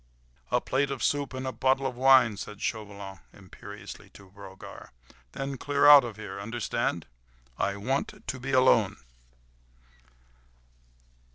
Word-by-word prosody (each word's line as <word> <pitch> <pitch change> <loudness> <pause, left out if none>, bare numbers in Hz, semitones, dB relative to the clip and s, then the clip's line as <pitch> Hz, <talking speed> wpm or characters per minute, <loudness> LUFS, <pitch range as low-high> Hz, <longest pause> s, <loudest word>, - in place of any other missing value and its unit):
"A - - +2
plate 135 +1 -1
of 135 -2 -4
soup 145 -1 0
and 130 0 -5
a 130 - -2
bottle 135 +1 +1
of 130 -2 -2
wine," 130 -4 +5
said 105 0 -8
Chauvelin 100 -4 -5
imperiously - - -11
to 95 -2 -15
Brogard, 95 -1 -12 0.4
"then 135 -1 -5
clear 145 0 +1
out 145 -2 +10
of 115 -4 -7
here—understand? 110 +2 -3 0.5
I 100 +1 0
want 130 +7 -3
to 130 - -4
be 135 +2 -5
alone." 115 -6 +4
120 Hz, 125 wpm, -28 LUFS, 100-135 Hz, 0.5 s, out